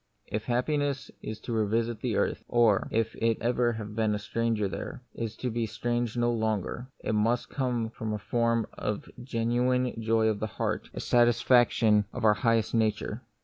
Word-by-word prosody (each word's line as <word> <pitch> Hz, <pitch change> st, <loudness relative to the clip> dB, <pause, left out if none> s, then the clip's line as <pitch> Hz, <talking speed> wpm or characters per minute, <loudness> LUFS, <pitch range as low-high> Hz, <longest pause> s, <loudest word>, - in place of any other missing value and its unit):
If 105 Hz, +1 st, -4 dB
happiness 140 Hz, +2 st, 0 dB
is 110 Hz, 0 st, -6 dB
to 120 Hz, -, -4 dB
revisit 115 Hz, +1 st, 0 dB
the -, -, -1 dB
earth, -, -, 0 dB
or, 115 Hz, -4 st, +3 dB
if 115 Hz, 0 st, 0 dB
it 115 Hz, -1 st, +1 dB
have 120 Hz, +1 st, 0 dB
ever 120 Hz, -1 st, +3 dB
been 110 Hz, 0 st, -1 dB
a -, -, -1 dB
stranger 110 Hz, 0 st, -1 dB
there, 95 Hz, +7 st, -6 dB
is 115 Hz, -1 st, -4 dB
to 125 Hz, +1 st, -3 dB
be 115 Hz, 0 st, -1 dB
strange 120 Hz, 0 st, -2 dB
no 120 Hz, 0 st, +2 dB
longer, 110 Hz, +2 st, -2 dB, 0.2 s
it -, -, -1 dB
must 115 Hz, +3 st, +1 dB
come 120 Hz, -4 st, -1 dB
in 110 Hz, -, -2 dB
the 105 Hz, -, -1 dB
form 115 Hz, +1 st, +1 dB
of 105 Hz, -1 st, -3 dB
a -, -, -13 dB
gen 115 Hz, -2 st, -2 dB
uine 125 Hz, 0 st, +1 dB
joy 110 Hz, 0 st, +2 dB
of 110 Hz, -2 st, 0 dB
heart, 110 Hz, -1 st, -2 dB
a -, -, -4 dB
satisfaction 120 Hz, -3 st, +4 dB
of 120 Hz, -2 st, -2 dB
our 105 Hz, -, +7 dB
highest 115 Hz, +1 st, +1 dB
nature. 110 Hz, 0 st, 0 dB
115 Hz, 185 wpm, -28 LUFS, 110-120 Hz, 0.2 s, our